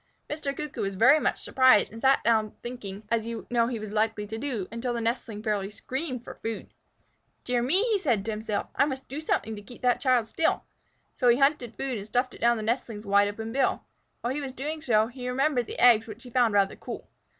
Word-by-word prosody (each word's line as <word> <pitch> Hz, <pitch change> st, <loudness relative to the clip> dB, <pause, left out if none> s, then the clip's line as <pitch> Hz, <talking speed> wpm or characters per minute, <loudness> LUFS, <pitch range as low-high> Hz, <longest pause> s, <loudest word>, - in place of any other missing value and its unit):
Mr. 285 Hz, -2 st, -3 dB
Cuckoo 300 Hz, -1 st, -4 dB
was 195 Hz, -1 st, -2 dB
much 265 Hz, +10 st, +4 dB
surprised, 260 Hz, -6 st, +4 dB
and 225 Hz, -, -9 dB
sat 270 Hz, +1 st, +4 dB
there 220 Hz, -2 st, +3 dB
thinking, 215 Hz, -5 st, -7 dB
as 230 Hz, -1 st, +1 dB
you 230 Hz, -1 st, -5 dB
know 235 Hz, -1 st, +3 dB
he 240 Hz, -1 st, -2 dB
was 215 Hz, -1 st, -6 dB
likely 215 Hz, 0 st, 0 dB
to 220 Hz, +2 st, -6 dB
do, 235 Hz, -9 st, -3 dB
until 235 Hz, +2 st, -2 dB
the -, -, -1 dB
nestling 225 Hz, -2 st, -2 dB
fairly 205 Hz, -3 st, -1 dB
screamed 255 Hz, +4 st, -5 dB
for -, -, -10 dB
food. 225 Hz, -1 st, -5 dB, 0.7 s
"Dear 245 Hz, -1 st, 0 dB
me!" 395 Hz, -, +2 dB
said 260 Hz, -, +2 dB
he 195 Hz, -, -5 dB
to 220 Hz, -, -3 dB
himself, 215 Hz, -1 st, -3 dB
"I -, -, +4 dB
must 270 Hz, -2 st, -5 dB
do 280 Hz, +4 st, -5 dB
something 225 Hz, -7 st, -1 dB
to 205 Hz, -, -8 dB
keep 240 Hz, +5 st, -14 dB
that 245 Hz, -1 st, +3 dB
child 250 Hz, -4 st, +3 dB
still." 320 Hz, +9 st, 0 dB, 0.5 s
So 250 Hz, -, 0 dB
he 240 Hz, 0 st, +6 dB
hunted 275 Hz, -4 st, +2 dB
food 260 Hz, -5 st, -3 dB
and 200 Hz, -, -8 dB
stuffed 250 Hz, +3 st, 0 dB
it -, -, -13 dB
down 235 Hz, 0 st, +4 dB
the 215 Hz, -, -4 dB
nestling's 225 Hz, -2 st, -2 dB
wide 200 Hz, 0 st, +4 dB
open 220 Hz, +2 st, -5 dB
bill. 270 Hz, 0 st, +1 dB, 0.4 s
While 240 Hz, +2 st, -1 dB
he 295 Hz, -, -3 dB
was 270 Hz, -2 st, -5 dB
doing 300 Hz, +4 st, -4 dB
so, 220 Hz, -7 st, +3 dB
he 250 Hz, +1 st, -6 dB
remembered 255 Hz, -2 st, +1 dB
the -, -, -7 dB
eggs, 230 Hz, -2 st, +6 dB
which 220 Hz, +2 st, -9 dB
he 250 Hz, -, -11 dB
found 235 Hz, -4 st, +3 dB
rather 195 Hz, -1 st, +3 dB
cool. -, -, -8 dB
235 Hz, 230 wpm, -27 LUFS, 215-260 Hz, 0.7 s, he